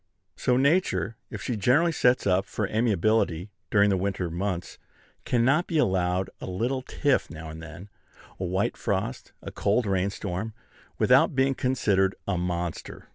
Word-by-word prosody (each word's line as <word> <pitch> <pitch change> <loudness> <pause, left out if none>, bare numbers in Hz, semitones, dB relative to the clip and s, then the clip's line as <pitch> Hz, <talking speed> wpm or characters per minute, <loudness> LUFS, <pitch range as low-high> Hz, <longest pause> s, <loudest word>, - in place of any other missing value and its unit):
So 125 -1 +1
Nature, 130 - +2
if - - -7
she 125 - -2
generally 135 - +3
sets 125 -5 +2
up 95 0 +2
for 105 - -2
amiability 110 -4 +1 0.2
during 105 -1 +4
the 95 - +2
winter 95 -2 -2
months, 90 0 -3 0.5
cannot 130 +8 +2
be 165 - -1
allowed 95 -6 +1
a - - -7
little 120 +8 -1
tiff 140 +1 0
now 80 0 -8
and 80 +1 -9
then, 85 +4 -10 0.5
a - - -3
white 95 +3 -1
frost, - - -3
a - - -6
cold 110 +4 +1
rain 95 -1 +1
storm, 100 +2 -5 0.4
without 135 +4 +4
being 135 +1 +3
considered 100 -8 +1
a 100 - 0
monster. 85 -1 -4
100 Hz, 155 wpm, -26 LUFS, 90-125 Hz, 0.5 s, during